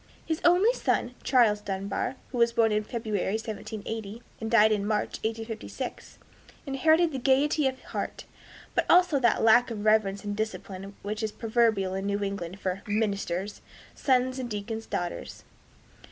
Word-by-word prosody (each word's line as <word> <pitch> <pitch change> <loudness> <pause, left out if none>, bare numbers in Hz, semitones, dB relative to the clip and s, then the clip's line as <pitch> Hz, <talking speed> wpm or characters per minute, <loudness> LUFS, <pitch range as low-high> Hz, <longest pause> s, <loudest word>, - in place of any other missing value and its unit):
His 320 0 -2
only 365 +7 +5
son, 245 - 0
Charles 235 -6 +3
Dunbar, 200 +5 -3 0.2
who 250 - -3
was 235 0 +4
born 225 -1 +3
in 210 0 +1
February, 215 -4 -2
1780, 220 0 -5 0.2
and 220 - -3
died 220 -2 +6
in 205 -2 +1
March, 215 -1 -1
1856, 225 0 -5 0.5
inherited 315 +5 +3
this 265 -3 -4
gaiety 280 +3 +3
of 260 0 -3
heart, - - -5 0.5
but - - +1
also 355 -5 +5
that 240 -3 +2
lack 240 +3 +6
of 215 -2 -5
reverence 215 -2 +3
and 205 0 -3
discipline 200 -2 -5
which 210 +2 -3
is 220 -1 -1
proverbial 220 -4 +1
in 195 +1 -3
New 200 0 -1
England 195 -2 -4
for 185 0 -2
"ministers' 200 -2 -2 0.3
sons 255 -1 +1
and 250 -2 -4
deacons' 220 +1 -5
daughters." 175 -1 -4
220 Hz, 155 wpm, -28 LUFS, 205-245 Hz, 0.5 s, died